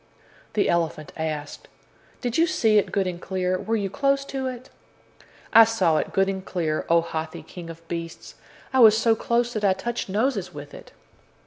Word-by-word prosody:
The 210 - +2
elephant 165 -3 -1
asked: 155 -2 -5 0.5
"Did 245 -1 -2
you 330 +1 +4
see 220 -8 +3
it - - -3
good 195 -2 +1
and 180 -1 -4
clear? 185 -1 -1
Were 225 - -1
you 205 -3 -1
close 275 +3 +1
to 270 -1 -3
it?" 255 0 -7 0.8
"I 225 - +10
saw 225 -8 +2
it - - -2
good 195 0 +2
and 190 -1 -3
clear, 160 -5 -2
O 170 0 +5
Hathi, 160 -1 -5
King 175 -2 -10
of 165 0 -11
Beasts. 165 0 -6 0.4
I 265 - +3
was 220 -2 +8
so 225 0 +3
close 240 +2 0
that 215 -2 -3
I 195 -2 +4
touched 235 +2 -4
noses 205 -3 0
with 145 0 -9
it." - - -12
195 Hz, 190 wpm, -24 LUFS, 170-230 Hz, 0.8 s, I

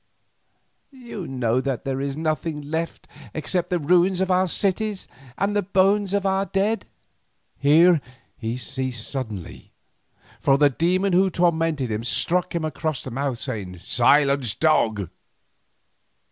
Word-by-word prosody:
You 240 - -8
know 125 -2 0
that 135 -2 -3
there 135 0 -2
is 140 0 -3
nothing 155 -1 -2
left 160 +3 -4 0.3
except 170 +3 -1
the 180 - +1
ruins 175 +4 +3
of 190 0 0
our 185 +1 +3
cities 200 +2 0 0.3
and 200 +2 0
the 205 - +3
bones 195 +1 +2
of 200 -1 -1
our 195 0 +1
dead." 205 +3 -1 0.7
Here 160 +3 +5 0.3
he 115 +1 -4
ceased 130 -3 -4
suddenly, 110 - -6 0.7
for 135 - +3
the 145 0 +4
demon 180 +6 +1
who 190 +2 +4
tormented 165 -7 0
him 110 +1 -2
struck 180 +8 +1
him 165 -2 -1
across 155 -1 -3
the 130 - -7
mouth 135 0 -2
saying, 95 -4 -5
"Silence, 135 - +3
dog." 110 - +2
155 Hz, 135 wpm, -23 LUFS, 130-185 Hz, 0.7 s, Here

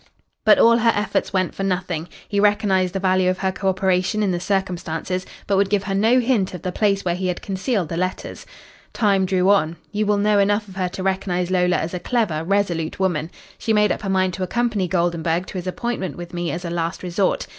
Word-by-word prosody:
"But - - +7
all 230 0 +6
her 230 0 +4
efforts 205 +1 -1
went 185 -2 0
for - - -6
nothing. 180 -3 -2 0.2
He 205 - -1
recognised 200 -3 +2
the - - 0
value 185 -1 +2
of 185 - 0
her 190 0 0
co 195 0 -1
operation 190 +2 +1
in 195 - +1
the 175 - -1
circumstances, 185 -1 -2 0.2
but 200 - +1
would 195 0 +2
give 200 -1 +1
her 195 - -3
no 225 +6 +4
hint 230 -7 +1
of 175 - -9
the 185 - -2
place 200 0 +1
where 175 - +1
he 185 +1 -2
had 180 - -3
concealed 195 - -1
the 165 - -3
letters. 185 +1 -4 0.5
Time 200 -4 +2
drew 185 +1 +3
on. 170 -5 +2 0.2
You 210 0 -1
will 205 0 +3
know 205 0 +3
enough 205 +1 +2
of 190 - -12
her 185 -2 -1
to 185 - -6
recognise 185 -2 -1
Lola 180 -1 +2
as 160 +3 -2
a 180 - -2
clever, 180 -7 -1
resolute 175 -4 -1
woman. 170 -5 0 0.3
She 225 - 0
made 210 0 +3
up - - -2
her 200 - -4
mind 185 -1 +1
to 190 - -6
accompany 220 -1 0
Goldenburg 170 -1 0
to 185 - -5
his 180 - -7
appointment 190 -4 -3
with 175 0 -8
me 175 -1 -2
as 175 +2 -4
a 170 - -3
last 170 +1 -3
resort. 185 +2 0
190 Hz, 230 wpm, -21 LUFS, 180-200 Hz, 0.5 s, But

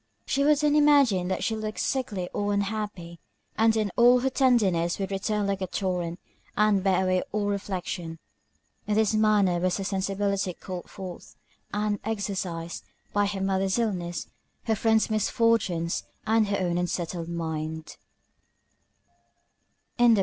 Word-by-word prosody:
She 280 - +1
would 300 +1 +5
then 295 0 +2
imagine 280 -11 +4
that 190 - -2
she 225 - 0
looked 215 0 -4
sickly 210 -9 -1
or 205 0 0
unhappy, 200 -4 -3 0.4
and 225 0 +4
then 215 -3 0
all 245 +1 +6
her 265 +1 0
tenderness 200 -11 +2
would 195 -1 -3
return 205 +1 -1
like 195 -1 -1
a 185 - -1
torrent, 180 -2 -2 0.4
and 210 -2 +3
bear 190 -1 +3
away 185 0 +2
all 210 -1 -1
reflection. 185 -4 -3 0.7
In 210 - +1
this 220 0 +3
manner 210 -5 +3
was 180 0 +1
her 195 - -3
sensibility 195 0 -1
called 180 -3 -7
forth, 185 -2 -9 0.4
and 210 0 -1
exercised, 190 -6 -3 0.3
by 205 0 +2
her 200 -1 -3
mother's 190 +1 +1
illness, 180 -7 -2 0.4
her 220 - +1
friend's 220 +1 +2
misfortunes, 215 -6 +1 0.2
and 220 0 +3
her 200 0 0
own 175 -2 0
unsettled 175 -1 -3
mind. 160 -1 -4
200 Hz, 140 wpm, -27 LUFS, 180-215 Hz, 0.7 s, all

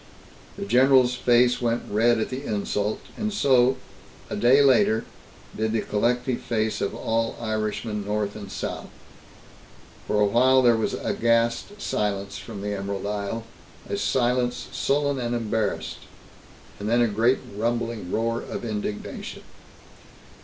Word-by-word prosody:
The - - -4
general's 125 +3 +5
face 125 0 +3
went 120 0 0
red 115 +3 +3
at 110 - -1
the 130 +2 -4
insult, 105 -2 -2
and 215 0 -2
so, 130 -9 +3 0.5
a - - -1
day 125 +7 +5
later, 115 -4 +4 0.5
did 110 0 -1
the 115 - +1
collective 125 +4 0
face 110 -2 -1
of 100 - -1
all 115 0 -1
Irishmen, 110 -1 -2
North 105 0 -2
and 100 -2 -8
South. - - -5 1.2
For 105 - +1
a 105 - +5
while 130 +5 +4
there 120 -1 +6
was 110 - -1
aghast 115 - 0
silence 100 - -2
from 105 -4 -8
the 105 0 -2
Emerald 100 0 -4
Isle, 105 +2 -3 0.4
a - - -2
silence 125 -8 0
sullen 140 -1 0
and 120 -1 -1
embarrassed. 110 -3 -2 0.8
And 105 +1 -3
then 120 +1 +3
a 120 - +4
great 115 +5 +2 0.2
rumbling 115 -3 -2
roar 115 +1 0
of - - -6
indignation. 105 -1 -5
115 Hz, 140 wpm, -25 LUFS, 105-125 Hz, 1.2 s, there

